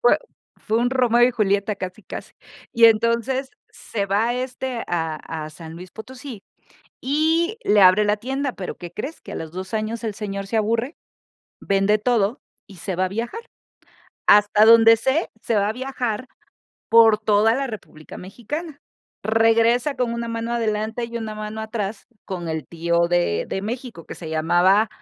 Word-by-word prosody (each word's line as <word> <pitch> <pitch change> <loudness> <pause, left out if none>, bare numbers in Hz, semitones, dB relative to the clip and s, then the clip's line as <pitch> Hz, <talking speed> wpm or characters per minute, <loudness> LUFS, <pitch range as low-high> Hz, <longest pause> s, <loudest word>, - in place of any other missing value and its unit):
Fue 485 - +4 0.4
fue 220 +1 -1
un 245 +1 +1
Romeo 245 -2 +3
y - - +2
Julieta 205 -2 +1
casi, 185 +2 -7
casi. - - -8 0.4
Y, 230 - +5
entonces 235 +4 +3 0.2
se 200 -3 -4
va 210 +5 +1
este 255 -1 -4
a 165 -2 -2 0.3
a 155 - -8
San 160 +1 -10
Luis 180 +2 -10
Potosí 250 0 -10 0.6
y 320 - +1
le 205 0 +4
abre 185 +3 +7
la 210 +1 +2
tienda, 270 +4 -3
pero 185 - -6
¿qué 175 -2 -9
crees? 270 - -6
Que - - -10
a - - -5
los 160 -1 -6
2 185 +3 -7
años 220 +2 -2
el 215 -3 -3
señor 200 -2 -5
se 225 - -1
aburre, 230 +7 -1 0.6
vende 195 +2 +2
todo 230 +1 +1 0.3
y 195 - -14
se 180 +1 -4
va 185 +1 +1
a - - -4
viajar, 230 - -4 0.9
hasta 210 +1 +6
donde 225 0 +8
sé, 265 +8 0
se 230 - -1
va 205 0 +2
a - - -2
viajar 255 -2 -3 0.6
por 225 -2 +6
toda 215 +1 +3
la 275 +2 -1
República 180 -8 -10
Mexicana, 285 - -7 0.4
regresa 225 +4 +3
con 245 -2 -1
una 235 0 -4
mano 230 +1 -3
adelante 220 0 -1
y 235 0 -6
una 220 -2 -4
mano 215 +1 -6
atrás 215 -2 -4 0.2
con 175 -3 -5
el 160 -4 -3
tío 170 0 0
de 175 - +1
de 195 - -3
México, 230 -5 -6
que - - -7
se 165 - -8
llamaba 175 +7 +3
220 Hz, 175 wpm, -22 LUFS, 195-240 Hz, 0.9 s, donde